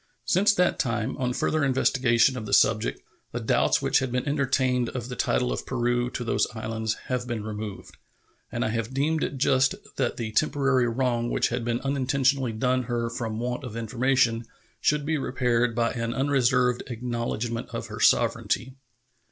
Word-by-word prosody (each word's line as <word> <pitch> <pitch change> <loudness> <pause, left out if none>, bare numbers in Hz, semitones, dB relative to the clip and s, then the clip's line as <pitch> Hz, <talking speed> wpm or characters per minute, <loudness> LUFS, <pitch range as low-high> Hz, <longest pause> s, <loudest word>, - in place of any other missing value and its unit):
Since 200 - +3
that 180 -1 +2
time, 115 0 -1
on 125 -1 -1
further 155 +4 0
investigation 130 -2 +3
of 110 -4 -5
the - - -4
subject, 110 -1 +3 0.3
the - - -2
doubts - - +2
which - - +3
had 130 -2 -3
been 125 +3 -1
entertained 130 -4 +1
of 125 -1 -5
the 125 - -5
title 60 - 0
of - - -4
Peru 120 +1 0
to 125 - -4
those 115 - +1
islands 110 0 -2
have 125 -1 -2
been 115 -3 -3
removed, 105 -1 -7 0.5
and - - -1
I - - 0
have 115 +2 -3
deemed 155 +3 +1
it 140 - -3
just 130 -1 +3 0.2
that 130 -3 0
the 115 -2 -3
temporary 135 -1 +2
wrong 120 -1 0
which - - +1
had 120 0 -2
been 120 +1 -1
unintentionally 135 -1 +1
done 125 +3 0
her 115 -1 -2
from 115 -2 -4
want 125 +3 -3
of 115 -3 -6
information 120 0 +1 0.3
should 150 -1 +1
be 155 0 0
repaired 125 -3 0
by 115 -1 +1
an 115 -2 -3
unreserved 125 -3 +2
acknowledgment 120 -1 -3
of - - -5
her - - -8
sovereignty. 130 +2 +2
125 Hz, 175 wpm, -26 LUFS, 115-130 Hz, 0.5 s, Since